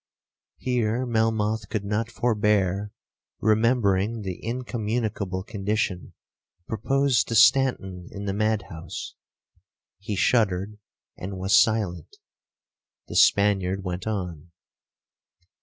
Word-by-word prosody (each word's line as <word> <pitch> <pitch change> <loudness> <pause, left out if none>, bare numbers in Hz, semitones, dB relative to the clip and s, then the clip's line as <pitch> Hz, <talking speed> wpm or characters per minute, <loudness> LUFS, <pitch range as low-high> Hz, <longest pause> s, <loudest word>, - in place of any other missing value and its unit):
Here 125 -1 0
Melmoth 110 -2 0
could 105 -2 -3
not 105 +3 -1
forbear 105 -4 +1 0.5
remembering 110 -1 +2
the 95 -2 -6
incommunicable 110 -5 -2
condition 100 -3 -2 0.5
proposed 135 +4 +1
to 115 - -2
Stanton 100 -8 +3
in 100 0 -7
the 100 - -1
mad 110 0 0
house,—he 90 +3 -10
shuddered, 105 -1 +1 0.4
and 95 +1 -5
was 95 +2 +2
silent. 100 -6 +1 0.9
The - - -6
Spaniard 95 -2 +3
went 90 +1 -4
on. 90 -6 -4
105 Hz, 90 wpm, -25 LUFS, 95-110 Hz, 0.9 s, Stanton